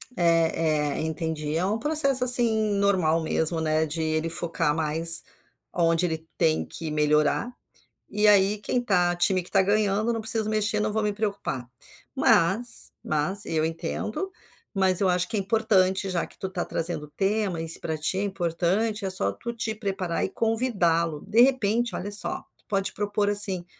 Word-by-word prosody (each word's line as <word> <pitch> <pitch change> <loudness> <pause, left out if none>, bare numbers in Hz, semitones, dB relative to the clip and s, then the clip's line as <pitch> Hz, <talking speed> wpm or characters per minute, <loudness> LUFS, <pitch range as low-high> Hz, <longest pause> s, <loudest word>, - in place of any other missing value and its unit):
Eh 165 -4 0
eh, - - -4
entendi. 160 -1 -4
É 170 +3 -1
um 205 +3 -2
processo, 275 -1 +3
assim, 230 -4 +5
normal 185 -5 0
mesmo, 160 +1 -1
né, 155 0 -1
de 160 +2 -5
ele 155 +1 -2
focar 165 -2 -1
mais 165 +1 0 0.5
aonde 165 0 0
ele 160 -1 -5
tem 160 -2 +1
que 160 - -4
melhorar. 150 +8 0 0.6
E 210 +1 0
aí 200 0 +4
quem 245 - -2
está 180 -7 0
time 185 +1 +1
que 175 - -9
está 195 - +2
ganhando, 210 +2 0
não 225 - -4
preciso 220 -1 +6
mexer, 215 0 0
não 210 0 -2
vou 220 - -1
me 210 -1 -2
preocupar. 200 - -5 0.5
Mas, 195 +9 +2
mas, 155 +7 -1
eu 160 -1 -1
entendo, 170 - -5 0.4
mas, 190 -2 +4
eu 195 - +2
acho 180 0 0
que 225 - -6
é - - 0
importante, 195 -2 0
já 175 -3 -2
que - - -16
tu 190 - -5
está 185 -2 -4
trazendo 165 -2 0
temas, 195 -3 -2
e - - -7
se 165 - +2
pra 160 -1 -5
ti 160 +5 -1
é - - -2
importante, 195 +3 -2
é - - -2
só 185 - +2
tu 235 0 -8
te 220 -1 -3
preparar 195 -5 -4
e - - -5
convidá-lo. 185 -9 -2
De 230 - +3
repente, 240 -4 +1
olha 205 +3 -6
só, 205 - +7 0.2
tu - - -33
pode 195 -1 -3
propor, 205 0 -2
assim, 195 -3 +5
190 Hz, 180 wpm, -24 LUFS, 165-215 Hz, 0.6 s, só